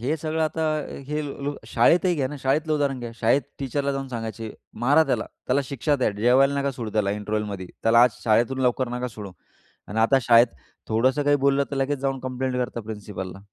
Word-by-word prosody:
हे 140 +7 0
सगळं 160 +1 -2
आता 160 +1 -1 0.4
हे 150 +1 -2
ल् 140 0 -4 0.2
शाळेतही 180 +1 +4
घ्या 135 -5 -1
ना 150 - -6
शाळेतलं 150 +4 +1
उदाहरण 140 -3 0
घ्या, 120 -1 -5
शाळेत 120 +4 +2 0.2
टीचरला 140 +1 -1
जाऊन 135 -1 -4
सांगायचे, 115 -2 -5 0.3
"मारा 145 +5 +5
त्याला. 125 -6 0 0.2
त्याला 130 +3 +2
शिक्षा 140 +2 0
द्या. 130 - +1
जेवायला 125 +7 +3
नका 140 0 0
सोडू 115 -3 -5
त्याला 105 -2 +1
इंटरवलमध्ये, 105 -2 -3 0.2
त्याला 115 +1 +6
आज 125 - +5
शाळेतून 120 +4 +2
लवकर 125 0 +1
नका 125 +1 -3
सोडू." 105 -4 -9 0.6
आणि 110 +3 -3
आता 125 +5 +4
शाळेत 115 +1 +6 0.4
थोडंसं 130 +6 +2
काही 145 0 +3
बोललं 140 0 +3
तर 140 - -3
लगेच 135 +1 0
जाऊन 135 0 -1
कंप्लेंट 130 0 -3
करतात 120 -2 -3
प्रिन्सिपलला. 105 -3 -7
130 Hz, 190 wpm, -24 LUFS, 115-140 Hz, 0.6 s, त्याला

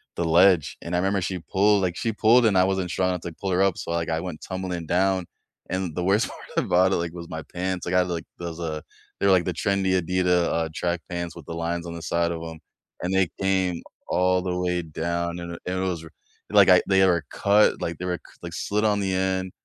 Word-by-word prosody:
the 85 - -1
ledge, 85 0 +4
and 85 +1 -3
I - - +2
remember 95 +1 +1
she 90 0 -3
pulled 100 +5 +2
like, 90 -2 -1
she 115 -2 -1
pulled, 115 +3 +5
and 100 -4 +3
I 90 - +6
wasn't 95 -2 -1
strong 95 0 +1
enough 90 -2 -2
to 85 - -6
pull 95 -2 -2
her 90 +1 +2
up, 95 -3 +1
so, - - -5
like, 85 -1 -1
I 80 0 0
went 90 -4 -6
tumbling 95 -3 -4
down, 95 +1 +1 0.4
and 95 -3 -2
the 90 - -1
worst 100 +4 +2
part - - -11 0.2
about 95 +2 +3
it, - - +2
like, 85 0 -3
was 85 -1 -8
my 80 0 -5
pants. 90 0 -2
I 85 - -2
got, 90 0 +3
like 85 -2 -3 0.2
those 85 -1 -6
uh, 80 -2 -3 0.4
they're, 100 - +3
like, 90 -2 +4
the 90 - 0
trendy 95 +1 +1
Adidas, 90 0 +2
uh, 80 -1 0
track 85 +1 -2
pants 85 -1 -4
with 85 - -11
the - - -5
lines 85 +1 -3
on 85 - -6
the 85 - -7
side 85 +1 0
of 85 -1 -4
'em, 80 -1 -9 0.4
and 90 +2 -1
they 95 -3 +3
came 95 -3 +1 0.3
all 90 0 +2
the 90 -1 -2
way 90 -1 0
down, 85 +2 -3
and 85 -1 -6
it 90 - -2
was 95 -3 -2
ri 80 - -13 0.4
like, - - +6
I - - +7
they 95 -1 +5
were 85 -4 +2
cut, 105 +1 +3
like, 85 -2 -3
they 90 - -4
were 90 -1 -1
c - - -21
like, - - -6
slid 105 +1 -1
on 105 -1 +2
the 95 -1 -1
end, 95 0 -1
90 Hz, 245 wpm, -25 LUFS, 85-95 Hz, 0.4 s, I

